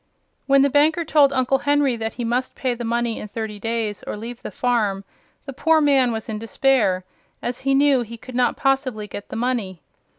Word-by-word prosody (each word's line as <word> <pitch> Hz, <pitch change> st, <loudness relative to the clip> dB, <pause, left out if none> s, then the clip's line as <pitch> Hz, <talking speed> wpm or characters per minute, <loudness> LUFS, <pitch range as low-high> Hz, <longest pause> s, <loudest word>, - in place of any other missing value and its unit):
When 275 Hz, 0 st, +5 dB
the 280 Hz, -, +3 dB
banker 315 Hz, +4 st, +3 dB
told 290 Hz, -3 st, +4 dB
Uncle 265 Hz, 0 st, +1 dB
Henry 285 Hz, -3 st, +2 dB
that 225 Hz, -1 st, -4 dB
he 245 Hz, -, -4 dB
must 245 Hz, +2 st, -1 dB
pay 255 Hz, -2 st, -1 dB
the 240 Hz, 0 st, -6 dB
money 235 Hz, 0 st, -1 dB
in -, -, -6 dB
thirty 215 Hz, -1 st, -5 dB
days 225 Hz, -2 st, -2 dB
or -, -, -4 dB
leave 235 Hz, +3 st, -8 dB
the -, -, -6 dB
farm, 215 Hz, -6 st, 0 dB, 0.4 s
the 275 Hz, -, -7 dB
poor 320 Hz, +4 st, +3 dB
man 275 Hz, -4 st, +3 dB
was 220 Hz, -1 st, -4 dB
in 215 Hz, -1 st, -4 dB
despair, 225 Hz, -5 st, +1 dB, 0.4 s
as 240 Hz, +1 st, -4 dB
he 270 Hz, 0 st, +1 dB
knew 275 Hz, -2 st, +4 dB
he 235 Hz, 0 st, -7 dB
could 255 Hz, +3 st, -11 dB
not 245 Hz, 0 st, +1 dB
possibly 265 Hz, -5 st, 0 dB
get 205 Hz, -1 st, -9 dB
the -, -, -6 dB
money. 225 Hz, -, -2 dB
245 Hz, 205 wpm, -22 LUFS, 225-270 Hz, 0.4 s, When